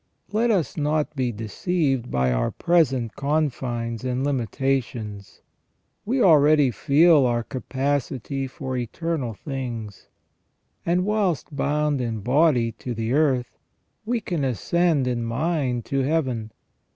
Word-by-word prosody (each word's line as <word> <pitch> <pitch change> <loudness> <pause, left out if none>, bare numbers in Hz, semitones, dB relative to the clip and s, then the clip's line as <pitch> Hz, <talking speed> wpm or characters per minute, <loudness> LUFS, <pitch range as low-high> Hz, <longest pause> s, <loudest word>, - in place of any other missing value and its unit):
Let 225 +3 +2
us 190 -8 0
not 150 0 0
be 130 -3 0
deceived 130 - -1
by 65 -1 +1
our - - 0
present 135 -9 +1
confines 125 -6 -1
and 130 0 -1
limitations. 120 -6 -2 0.6
We 245 +3 +1
already 150 -5 +5
feel 145 +2 +4
our 120 -1 0
capacity 135 +1 -2
for 130 0 -5
eternal 125 0 -3
things, 120 -6 -6 0.8
and 180 +2 +2
whilst 200 -8 0
bound 145 0 0
in 115 -3 -3
body 125 -1 +3
to 125 -2 -4
the 115 +2 -2
earth, 135 -5 +1 0.4
we 235 +2 -1
can 175 -7 -2
ascend 150 +3 +1
in 120 -2 -1
mind 125 0 -1
to 135 - -1
Heaven. 130 -6 -1
135 Hz, 120 wpm, -24 LUFS, 120-155 Hz, 0.8 s, already